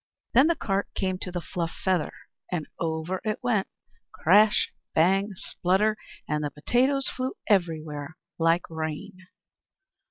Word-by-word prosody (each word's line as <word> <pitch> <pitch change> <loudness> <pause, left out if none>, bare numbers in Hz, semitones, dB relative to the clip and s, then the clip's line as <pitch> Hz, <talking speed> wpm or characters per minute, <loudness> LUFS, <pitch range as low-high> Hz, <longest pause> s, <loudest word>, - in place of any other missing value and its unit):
Then 265 +6 +7
the 335 - +3
cart 200 -6 -1
came 185 -1 -1
to 180 - -5
the 175 -1 -3
fluff 170 0 -3
feather, 185 -4 +1 0.4
and 165 -4 -1
over 165 +3 -2
it 215 -1 -1
went 220 -6 +1 0.4
crash, 210 +1 +4 0.2
bang, 195 +5 +4
splutter; 190 +5 +1 0.3
and 150 0 0
the 145 - -1
potatoes 260 - +1
flew 260 +1 -2
everywhere, 160 -6 0 0.2
like 165 +1 +3
rain. 165 +4 -5
185 Hz, 130 wpm, -27 LUFS, 160-210 Hz, 0.4 s, Then